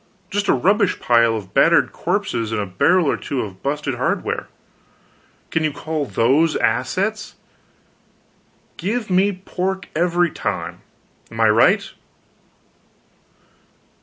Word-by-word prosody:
Just 205 0 -1
a - - +4
rubbish 195 - +2
pile 115 -1 +3
of 100 -3 -7
battered - - +4
corpses 115 -2 -2
and 110 - -1
a 100 - -1
barrel 170 - +2
or 140 - +1
two 135 - -3
of 95 -3 -8
busted 140 0 -2
hardware. 120 - -2 1.0
Can 160 - 0
you 155 - +1
call 155 +1 -3
those 140 +7 +2
assets? 195 - -1 1.4
Give 215 +3 -3
me 190 +3 +3
pork, 190 0 -4
every 175 0 +2
time. - - -4 0.5
Am 115 - -9
I 110 -1 +5
right?" 105 +2 +3
155 Hz, 120 wpm, -20 LUFS, 115-185 Hz, 1.4 s, I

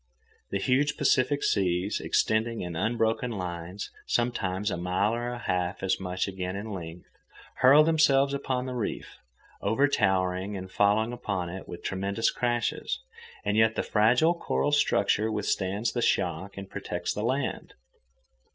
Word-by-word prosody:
The 100 - -1
huge 135 +8 +1
Pacific 140 -1 +2
seas, 90 +1 +1
extending 110 +1 +1
in 90 -2 -5
unbroken 115 +5 0
lines 90 -2 -5 0.2
sometimes 105 -5 0
a - - -2
mile 90 +5 0
or 120 +1 -3
half 90 +1 -1
as 95 - +1
much 90 0 -2
again 95 -1 -4
in 105 +2 -5
length, 85 -2 -7 0.5
hurl 140 +4 +7
themselves 140 -4 +3
upon 130 -2 -2
the 130 - -4
reef, 120 -4 -4 0.4
overtowering 100 -5 +1
and 95 0 -8
falling 105 +4 +2
upon 100 -7 -3
it 95 +2 -8
with 85 - -9
tremendous 100 +4 0
crashes, 120 -1 -1 0.5
and 100 +1 +1
yet 110 0 +4
the - - 0
fragile 120 +10 +3
coral 145 -3 -1
structure 110 -6 +2
withstands 105 +1 -1
the 120 - -1
shock 95 -1 0
and 100 -1 -8
protects 90 0 -3
the 105 - -4
land. 130 +5 -2
105 Hz, 140 wpm, -28 LUFS, 95-120 Hz, 0.5 s, hurl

